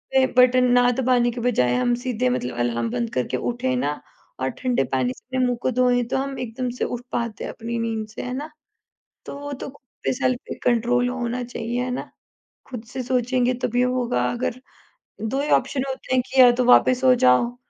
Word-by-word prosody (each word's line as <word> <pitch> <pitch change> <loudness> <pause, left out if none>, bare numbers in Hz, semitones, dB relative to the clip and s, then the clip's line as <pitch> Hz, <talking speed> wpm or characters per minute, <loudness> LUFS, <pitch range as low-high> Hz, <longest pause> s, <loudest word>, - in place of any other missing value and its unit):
पे 265 0 +6
बटन 250 0 +6
ना 245 0 +5
दबाने 245 -2 +2
के 240 0 -6
बजाय 125 - +2
हम 240 - +2
सीधे 250 0 0
मतलब 125 - -2
अलार्म 120 -1 0
बंद 235 -1 -2
करके 125 0 -1
उठें 250 - -1
ना 150 -11 -1 0.4
और 130 0 0
ठंडे 250 - +1
पानी 130 -1 0
से - - -21
अपने 255 - +3
मुँह 245 -1 0
को 255 - 0
धोएँ 245 0 +2
तो - - +1
हम 270 0 -3
एकदम 250 +1 -3
से - - 0
उठ 245 0 -4
पाते 235 -2 -3
हैं - - -4
अपनी 235 +1 -5
नींद 225 -1 -2
से, 215 - -8
है 250 0 -5
ना? 295 +4 -5 0.8
तो 280 - -7
वो 285 0 -6
तो 270 - -6
खुद 285 - -17 0.2
पे - - +1
सेल्फ 255 -1 0
पे - - -4
कंट्रोल 245 +1 +2
होना 245 0 -3
चाहिए, 240 +1 -3
है 250 - -3
ना? 250 - -4 0.6
खुद 245 -4 -7
से 255 +1 -5
सोचेंगे 250 0 +1
तभी 245 +1 +1
होगा 250 - 0
अगर 235 - -3 0.6
2 265 +5 -1
ही 295 - -2
ऑप्शन 265 -3 0
होते 260 0 -3
हैं 250 - +3
कि 265 - +2
या 245 -1 +9
तो 250 - +3
वापस 250 +1 +5
सो 260 -1 +5
जाओ, 235 - +3
245 Hz, 215 wpm, -23 LUFS, 230-255 Hz, 0.8 s, या